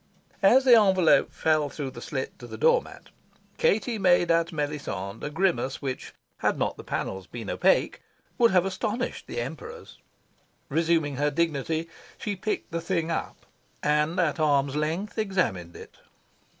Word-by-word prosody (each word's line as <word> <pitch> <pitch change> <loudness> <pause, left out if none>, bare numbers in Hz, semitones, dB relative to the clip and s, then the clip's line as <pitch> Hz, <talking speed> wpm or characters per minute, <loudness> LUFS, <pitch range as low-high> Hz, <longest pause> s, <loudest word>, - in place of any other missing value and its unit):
As 265 +1 +5
the 250 - +7
envelope 190 -4 +4
fell 155 -2 +1
through 140 -2 -5
the 120 -2 -10
slit 135 0 -5
to 120 - -9
the 110 -1 -8
door - - +4
mat, - - -14 0.5
Katie 220 +2 +1
made 175 -3 +4
at 165 0 +2
Melisande 145 - -4
a - - -2
grimace 160 -6 0
which, 130 -3 -5 0.3
had - - +1
not - - -1
the - - -10
panels 95 -1 -4
been 115 -4 -6
opaque, - - +2 0.4
would 235 -1 +6
have 185 -3 +3
astonished 215 +5 -3
the - - -4
Emperors. 470 -1 -7 0.7
Resuming 160 -2 +1
her 145 +1 +2
dignity, 160 +1 -1 0.3
she 205 - -3
picked 210 +3 -3
the 170 0 -2
thing 170 -1 -1
up, 165 - -4 0.4
and, 150 +4 +1
at 170 -2 +1
arm's 140 -2 +2
length, 165 +9 -2
examined 185 - -1
it. - - -13
160 Hz, 155 wpm, -26 LUFS, 140-190 Hz, 0.7 s, the